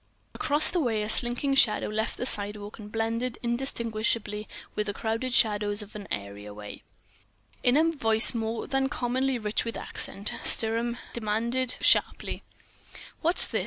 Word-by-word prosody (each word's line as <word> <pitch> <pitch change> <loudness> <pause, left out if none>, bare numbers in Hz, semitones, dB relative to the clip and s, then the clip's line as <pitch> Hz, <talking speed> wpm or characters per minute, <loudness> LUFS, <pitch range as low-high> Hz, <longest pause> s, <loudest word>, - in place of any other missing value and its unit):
Across 295 +1 +3
the 355 - 0
way 225 -8 0
a 210 - -4
slinking 240 +4 +4
shadow 270 -6 +3
left 220 +1 -2
the - - -3
sidewalk 205 -2 -2
and 210 -1 -10
blended 230 +2 -2
indistinguishably 230 -3 -2 0.3
with 210 0 -2
the 205 - -4
crowded 225 +3 -2
shadows 210 -3 +1
of 210 - -16
an 205 -2 -8
areaway. 105 +1 -7 0.8
In 250 +3 +3
a 325 +1 +3
voice 225 -7 +4
more 225 -1 -3
than 270 0 0
commonly 260 +1 -1
rich 215 -2 -1
with 230 - -5
accent, 200 +2 -3
Sturm 230 +2 +3 0.2
demanded 235 +3 -1
sharply: - - +2 0.8
"What 340 +2 +1
is - - +7
this? - - 0
225 Hz, 150 wpm, -27 LUFS, 210-250 Hz, 0.8 s, is